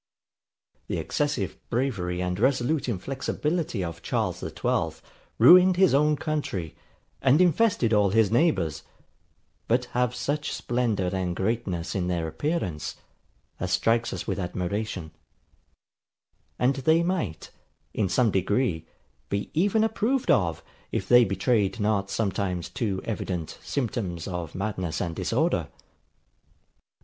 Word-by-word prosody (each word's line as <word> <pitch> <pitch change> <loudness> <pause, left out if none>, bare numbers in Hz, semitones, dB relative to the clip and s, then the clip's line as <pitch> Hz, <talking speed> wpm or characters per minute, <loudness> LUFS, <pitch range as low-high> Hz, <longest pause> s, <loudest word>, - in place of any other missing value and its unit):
The - - -2
excessive - - -2
bravery 100 -9 -1
and 90 +1 -2
resolute 130 +3 +1
inflexibility 135 - -2
of 85 -2 -6
Charles - - -1
the - - -5
XIIth - - -1 0.4
ruined 180 +9 +8
his 190 -4 +5
own 150 +2 +4
country, 145 - -3 0.5
and 135 +3 +4
infested 180 - +3
all 105 -2 +4
his 110 0 +3
neighbours; 120 - +2 0.9
but 125 +2 +2
have 125 0 +1
such 145 +4 -2
splendour 115 -7 -1
and 90 -2 -1
greatness 95 -5 -2
in 90 -2 -1
their 85 -2 -1
appearance, 90 - -2 0.6
as 90 0 -2
strikes 115 +3 +2
us - - -5
with - - -2
admiration; 90 -1 -3 1.5
and 130 +2 +2
they 160 +5 +3
might, 165 - -2 0.4
in 100 -4 0
some 120 +2 +3
degree, 95 -3 0 0.4
be 100 +1 -2
even 205 +7 +2
approved 225 +4 +1
of, 85 -6 +1 0.3
if 95 - -2
they 120 0 +7
betrayed 100 +2 +1
not 105 -2 +1
sometimes 95 -4 -1
too 100 -5 -2
evident 90 -7 -4
symptoms 105 - -3
of 90 -4 -5
madness 95 -5 -2
and 85 -2 -3
disorder. - - 0
110 Hz, 120 wpm, -26 LUFS, 90-135 Hz, 1.5 s, ruined